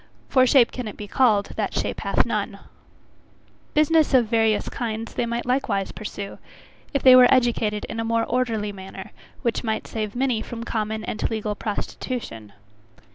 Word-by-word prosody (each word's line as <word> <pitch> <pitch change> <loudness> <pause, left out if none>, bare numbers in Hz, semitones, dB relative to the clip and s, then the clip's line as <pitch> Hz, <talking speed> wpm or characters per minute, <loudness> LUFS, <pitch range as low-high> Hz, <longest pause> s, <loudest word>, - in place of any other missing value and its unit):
For 255 -1 +4
shape 250 -2 +5
can 250 -3 -5
it 210 - -8
be 210 - -7
called, 215 -3 +2
"that - - -2
shape - - -2
hath - - +1
none?" - - -2 1.2
Business 305 -1 +4
of 245 -2 +5
various 220 -1 +1
kinds, 225 -2 -4
they 235 - -1
might 235 +1 -3
likewise 250 -6 0
pursue, 200 -2 -7 0.5
if 280 - -1
they 255 -1 +9
were 250 -1 +7
educated 230 -5 +2
in 225 - -6
a - - 0
more 230 0 +1
orderly 225 -4 -1
manner, 190 +1 -9 0.3
which 235 0 0
might 220 -2 -2
save 215 -1 -4
many 250 -3 0
from 230 0 -6
common 220 -1 -3
and 215 - -2
legal 215 -1 -2
prostitution. 205 - -5
225 Hz, 165 wpm, -23 LUFS, 210-250 Hz, 1.2 s, they